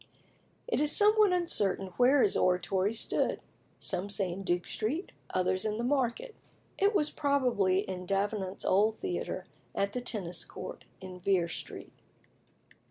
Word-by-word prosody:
It 480 - 0
is 300 0 +4
somewhat 425 -1 +6
uncertain 205 - +1
where 255 +2 +5
his 200 - +2
Oratory 185 +2 +1
stood: 225 - 0 0.4
some 190 +3 -1
say 195 -3 0
in 185 +3 -6
Duke 175 -2 -1
Street; 280 - -3 0.2
others, 185 0 0
in 215 -1 -2
the 235 - -3
market. 275 - -1 0.5
It 405 +2 +3
was 300 -5 +2
probably 250 -10 +1
in 180 -2 -6
Davenant's 195 0 -2
old 215 +3 +3
theatre, 370 - -4 0.3
at 200 +1 -1
the 250 - -3
Tennis 200 -8 -3
Court - - -9 0.2
in 185 -1 -9
Vere 180 -2 +1
Street. 170 - -8
205 Hz, 145 wpm, -30 LUFS, 185-280 Hz, 0.5 s, somewhat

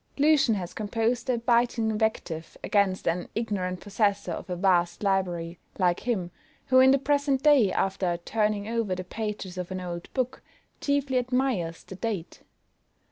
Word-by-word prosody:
LUCIAN 290 -6 +4
has 180 -3 -5
composed 225 +4 -1
a 250 - +2
biting 235 -1 +2
invective 210 -7 -2
against 200 -2 +1
an 170 +2 -1
ignorant 195 -5 -2
possessor 205 -1 0
of - - -6
a 180 - -2
vast 175 0 +2
library, 180 -4 -1 0.2
like 180 -2 +2
him, 190 -8 -2 0.4
who 260 0 +6
in 260 0 +7
the 275 - +6
present 280 -1 +1
day, 280 -10 +5
after 185 -3 0
turning 210 +3 -1
over 225 -4 -1
the 185 - -5
pages 205 -2 -5
of 180 - -4
an 185 0 -4
old 175 -1 -6
book, 255 -1 -1 0.4
chiefly 280 -2 +1
admires 245 -10 -1
the - - -10
date. 195 -4 -4
210 Hz, 155 wpm, -27 LUFS, 180-245 Hz, 0.4 s, in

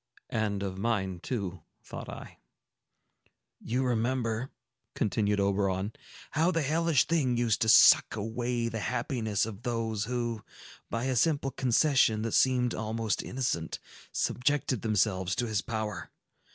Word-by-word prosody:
"And 105 -3 -1
of 95 -1 -4
mine, 95 -5 -1
too," 95 -5 -4 0.2
thought - - -8
I. - - -10 1.2
"You 125 +3 -1
remember," 120 0 -1 0.5
continued 105 -1 0
Oberon, 100 0 0 0.4
"how 160 +4 +2
the 165 -4 0
hellish 160 -1 +2
thing 135 -8 +1
used 120 -1 +1
to 110 - +2
suck - - +7
away 115 +2 -2
the 115 -1 -3
happiness 110 -4 -1
of 110 -1 -8
those 115 -3 -2
who, 120 -2 -3 0.5
by 115 - -2
a 130 0 0
simple 140 0 +1
concession 130 -3 +3
that 115 - -2
seemed 125 -2 +3
almost 110 -2 -2
innocent, 120 -11 -2 0.3
subjected 130 -2 0
themselves 100 -4 +1
to 120 - 0
his 110 -3 -1
power. 110 -5 -4
115 Hz, 130 wpm, -29 LUFS, 105-125 Hz, 1.2 s, suck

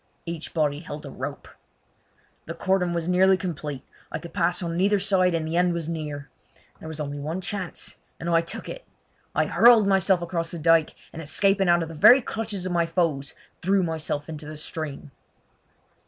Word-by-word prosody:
Each 165 -2 -6
body 150 -3 0
held 150 -2 -8
a 140 - -8
rope. 140 +3 -6 1.0
The 165 - -5
cordon 190 -2 +1
was 170 -1 -2
nearly 185 +1 +4
complete. 150 -7 -5 0.3
I - - -2
could 165 +1 -10
pass 175 -1 +1
on 165 -1 -3
neither 200 +3 +3
side, 185 -2 +3
and 160 -1 -2
the 160 - -3
end 175 0 +3
was 170 -2 -3
near. 150 -3 -5 0.5
There - - -9
was 160 -1 -5
only 145 -1 -4
one 155 +5 -3
chance, 190 -1 -4 0.2
and 165 - -5
I 165 -1 +4
took 165 - -6
it. - - -7 0.5
I - - +3
hurled 235 -3 +6
myself 190 -2 +3
across 170 -1 -2
the 175 - -5
dyke, 165 0 +3 0.2
and 160 - -6
escaping 195 +4 +2
out 175 -1 +4
of - - -5
the - - -8
very 215 - +8
clutches 220 -6 -4
of 185 - -2
my 170 -1 +1
foes 165 -5 -1 0.3
threw 190 +1 +2
myself 160 -3 -3
into 155 -2 -7
the 155 0 -7
stream. 150 -2 -6
170 Hz, 190 wpm, -25 LUFS, 155-185 Hz, 1.0 s, very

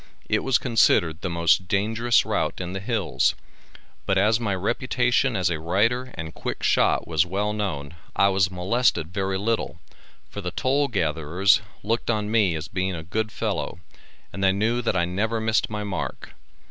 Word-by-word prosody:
It - - +2
was 135 -1 +3
considered 90 -9 +2
the 90 - -2
most 85 +1 +2
dangerous 115 +5 +2
route - - -1
in 90 0 -4
the 95 - -3
Hills, 115 +4 0 0.7
but 95 - +2
as 110 +4 +3
my 105 -5 -1
reputation 120 +5 +1
as 90 -2 +1
a 80 - -2
rider 115 +10 +1
and 80 -2 -6
quick - - -5
shot - - +2
was 80 -2 +2
well 100 +4 -2
known, 85 -9 -3 0.2
I 100 - +4
was 95 -1 +2
molested 90 -2 0
very 95 0 -1
little, 110 +3 -2 0.5
for 100 - -7
the 90 - -3
toll 135 - +1
gatherers 95 - +2 0.2
looked 115 +4 -1
on 105 -2 0
me 105 -7 +3
as 80 +1 -5
being 95 0 -2
a 80 - -6
good 110 +6 -2
fellow, - - -3 0.6
and 95 +2 -4
they 95 - +5
knew 115 +5 0
that 115 - -1
I 85 - +2
never 110 +6 -1
missed 110 0 +1
my 105 -1 -4
mark. 100 -5 -5
100 Hz, 175 wpm, -24 LUFS, 90-115 Hz, 0.7 s, they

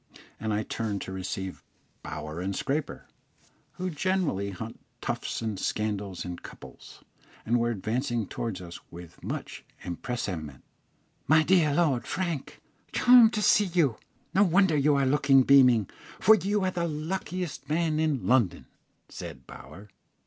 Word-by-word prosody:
and 110 -1 -2
I 105 +1 0
turned 110 -3 -3
to - - -7
receive 95 0 -5 0.4
Bower 75 +2 -6
and 95 +1 -2
Scraper, 145 +8 -3 0.7
who 185 0 -4
generally 160 - 0
hunt 110 +4 -7 0.2
tufts - - -3
and 110 -4 -3
scandal 105 -3 -2
in 90 -1 -5
couples, - - -13 0.4
and 120 +2 +2
were 120 0 +1
advancing 115 +2 -1
towards 100 -2 -4
us 85 -1 -9
with 85 -1 -12
much - - -5 0.2
empressement. 85 - -5 0.6
"My 155 +1 +5
dear 160 -5 +3
Lord 145 -8 +1
Frank, 170 -7 -3 0.3
charmed 245 -2 +7
to 210 - -1
see 205 - +5
you; 165 - +1 0.4
no 190 - +4
wonder 190 -2 +3
you 145 0 +3
are 140 -1 +2
looking 135 -1 +4
beaming, 125 -7 +6 0.3
for 220 - +7
you 205 0 +1
are 185 - +1
the 170 -2 -1
luckiest 160 -2 -4
man 155 0 +1
in 150 -9 0
London," 115 -5 +2 0.4
said 65 -1 -9
Bower. 85 +10 -12
130 Hz, 140 wpm, -28 LUFS, 100-170 Hz, 0.7 s, charmed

